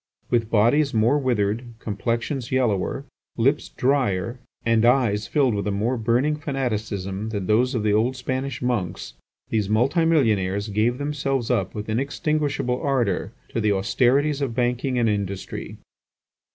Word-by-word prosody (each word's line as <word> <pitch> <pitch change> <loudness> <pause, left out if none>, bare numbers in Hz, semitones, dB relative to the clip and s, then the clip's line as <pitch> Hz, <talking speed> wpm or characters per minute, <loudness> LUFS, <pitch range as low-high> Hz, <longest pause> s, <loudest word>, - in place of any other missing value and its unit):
With 115 -2 +1
bodies 120 +6 +3
more 115 +7 +3
withered, 120 -2 -1
complexions 115 +4 -3
yellower, 125 0 0 0.3
lips 135 +6 +1
drier, 125 -4 0 0.3
and 115 -1 +3
eyes 120 -5 +3
filled 135 -3 +2
with 100 0 -2
a - - +1
more 110 +6 0
burning 125 +6 +1
fanaticism 110 -8 -3
than 100 -4 -3
those 125 +6 +2
of 110 - 0
the 105 -1 +2
old 115 +5 +2
Spanish 130 0 -3
monks, 110 -9 -2 0.4
these 105 -3 0
multimillionaires 110 - +2
gave 110 +4 +1
themselves 140 -4 -1
up 95 0 0
with 105 0 -5
inextinguishable 140 +1 -1
ardour 125 -9 0 0.2
to 115 - -2
the 105 -1 +2
austerities 130 +9 +2
of 130 -5 -2
banking 125 +1 0
and 120 -1 +2
industry. 100 -2 -3
120 Hz, 140 wpm, -23 LUFS, 105-135 Hz, 0.4 s, bodies